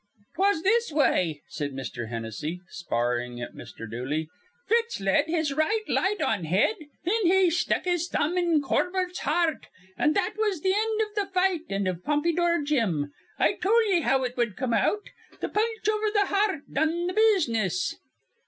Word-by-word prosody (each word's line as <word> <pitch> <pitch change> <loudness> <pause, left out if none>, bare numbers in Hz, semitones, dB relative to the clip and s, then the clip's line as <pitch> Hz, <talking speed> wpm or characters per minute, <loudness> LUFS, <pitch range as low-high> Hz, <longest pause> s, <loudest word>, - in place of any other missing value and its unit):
"'Twas 390 -4 +2
this 460 0 +2
way," 180 - +1
said 145 -3 -4
Mr. 125 -3 -5
Hennessy, 115 +9 -4
sparring 120 -6 -2
at 120 - -6
Mr. 115 - -9
Dooley. 135 +8 -3 0.4
"Fitz 460 +2 +1
led 195 +9 +2
his 315 -3 0
right 370 +10 +1
light 405 +1 +1
on 215 - 0
head, 185 - +3 0.3
thin 440 +6 +1
he 370 -1 +4
stuck 355 - 0
his 350 -1 0
thumb 330 0 0
in 340 -4 +2
Corbett's 360 +5 0
hear 330 +3 +2
rt, - - -14 0.3
an' 300 - +3
that 395 +2 0
was 420 -5 +1
th' - - -14
end 435 +1 +1
iv 425 -1 -1
th' 405 -2 -2
fight 365 -2 +2
an' 195 0 -1
iv 180 -1 -3
Pompydour 340 +2 +1
Jim. 190 - 0 0.2
I - - +3
tol' 455 +5 +4
ye 345 - +3
how 270 -3 +2
it 250 -1 -3
wud 235 -5 0
come 250 -2 -1
out. 415 - 0 0.3
Th' - - -4
punch 440 0 0
over 430 0 +1
th' 410 -2 +1
hear 400 0 +2
rt 290 - -16
done 320 +4 +1
th' 365 - -5
business." 235 - +2
315 Hz, 180 wpm, -26 LUFS, -, 0.4 s, he